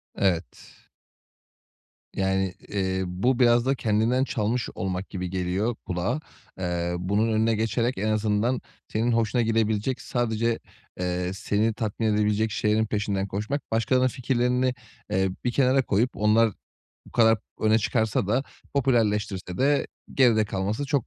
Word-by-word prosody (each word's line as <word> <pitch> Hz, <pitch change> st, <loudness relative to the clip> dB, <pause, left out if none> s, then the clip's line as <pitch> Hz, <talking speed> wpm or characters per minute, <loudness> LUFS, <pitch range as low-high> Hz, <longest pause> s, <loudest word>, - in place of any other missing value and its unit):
Evet. 90 Hz, -3 st, -2 dB, 1.4 s
Yani, 95 Hz, -1 st, 0 dB, 0.2 s
ııı, 95 Hz, -1 st, 0 dB
bu 120 Hz, +8 st, 0 dB
biraz 120 Hz, -1 st, +5 dB
da 135 Hz, +1 st, +2 dB
kendinden 115 Hz, +3 st, +1 dB
çalmış 115 Hz, -1 st, -1 dB
olmak 95 Hz, 0 st, -3 dB
gibi 90 Hz, -1 st, -4 dB
geliyor 95 Hz, +5 st, -1 dB
kulağa. 95 Hz, -, -1 dB, 0.4 s
Iıı, 90 Hz, -1 st, -1 dB
bunun 105 Hz, +5 st, +1 dB
önüne 110 Hz, +1 st, +2 dB
geçerek 115 Hz, +3 st, 0 dB
en 105 Hz, -, -1 dB
azından 110 Hz, +3 st, +1 dB, 0.3 s
senin 115 Hz, +3 st, 0 dB
hoşuna 115 Hz, +1 st, +2 dB
gidebilecek, 110 Hz, +2 st, 0 dB
sadece, 115 Hz, -1 st, 0 dB, 0.4 s
ııı, 90 Hz, 0 st, -1 dB
seni 105 Hz, +3 st, 0 dB
tatmin 110 Hz, +1 st, -2 dB
edebilecek 105 Hz, +1 st, +1 dB
şeylerin 110 Hz, +1 st, +1 dB
peşinden 100 Hz, -2 st, -1 dB
koşmak, 110 Hz, +9 st, -4 dB
başkalarının 125 Hz, +3 st, +2 dB
fikirlerini, 125 Hz, 0 st, 0 dB, 0.4 s
eee, 95 Hz, 0 st, +2 dB, 0.2 s
bir 125 Hz, -, +2 dB
kenara 135 Hz, +1 st, +3 dB
koyup 110 Hz, +6 st, +2 dB
onlar 110 Hz, +1 st, +3 dB, 0.6 s
bu -, -, -14 dB
kadar 110 Hz, -2 st, +4 dB, 0.2 s
öne 110 Hz, +1 st, +4 dB
çıkarsa 110 Hz, -2 st, 0 dB
da 120 Hz, +6 st, +1 dB, 0.3 s
popülerleştirse 105 Hz, -8 st, 0 dB
de 140 Hz, +2 st, +2 dB, 0.3 s
geride 115 Hz, -5 st, +4 dB
kalması 100 Hz, +6 st, -2 dB
çok 140 Hz, -4 st, 0 dB
110 Hz, 130 wpm, -26 LUFS, 100-120 Hz, 1.4 s, biraz